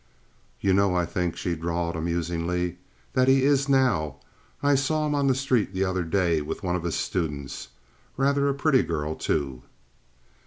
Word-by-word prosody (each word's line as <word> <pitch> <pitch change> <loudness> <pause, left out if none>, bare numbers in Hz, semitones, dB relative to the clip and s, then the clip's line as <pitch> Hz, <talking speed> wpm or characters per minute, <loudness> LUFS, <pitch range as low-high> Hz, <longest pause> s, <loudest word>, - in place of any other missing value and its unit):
"You 95 - +2
know 100 -1 +3
I 90 -1 +2
think," 85 0 -2
she 85 0 -2
drawled, 85 +1 -2
amusingly, 85 +1 -2 0.3
"that 130 0 +3
he 135 0 +5
is 140 0 +3
now. 120 - +2 0.5
I 145 0 +4
saw 150 +3 +1
him 150 - 0
on 140 -1 +1
the 130 - +3
street 125 -7 0
the 95 +1 +1
other 95 -1 -1
day 85 -2 +1
with 75 - -5
one 90 -1 0
of 90 - -3
his 85 - -1
students—rather 85 - -2
a - - +1
pretty 140 -2 +3
girl, 80 -2 -2
too." 70 -5 -2
90 Hz, 165 wpm, -26 LUFS, 85-135 Hz, 0.5 s, he